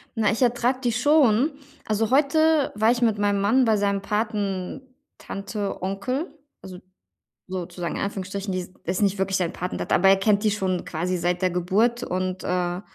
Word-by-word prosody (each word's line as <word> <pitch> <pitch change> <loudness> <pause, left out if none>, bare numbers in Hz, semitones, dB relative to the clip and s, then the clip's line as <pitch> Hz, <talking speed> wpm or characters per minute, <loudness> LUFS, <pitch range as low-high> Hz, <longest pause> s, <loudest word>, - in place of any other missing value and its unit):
Na, 215 -2 +2
ich 225 - -3
ertrage 245 +1 +2
die 240 - +2
schon. 265 +1 +3 0.3
Also, 215 +1 0
heute 300 +2 +3
war 220 +2 +3
ich 240 0 -1
mit 225 -3 +2
meinem 205 -1 +1
Mann 230 +6 +3
bei 220 -1 +3
seinem 200 -1 0
Patentante 210 +1 -4
Onkel, 250 - -3 0.2
also, 185 -1 -10 0.7
sozusagen 180 -2 -5
in - - -3
Anführungsstrichen. 200 0 -4
Die 185 -1 -2
die - - -27
ist 180 +2 -1
nicht 200 -1 +2
wirklich 190 0 0
seine 180 -2 -1
Patentante, 180 +1 -2
aber 195 +2 +5
er 195 - +6
kennt 205 +1 +2
die 215 - +3
schon 190 -3 -1
quasi 180 +3 -2
seit 175 +1 -1
der 185 - +2
Geburt 200 +7 +1
und, 185 +1 -3
äh 180 0 -1
200 Hz, 175 wpm, -24 LUFS, 185-235 Hz, 0.7 s, er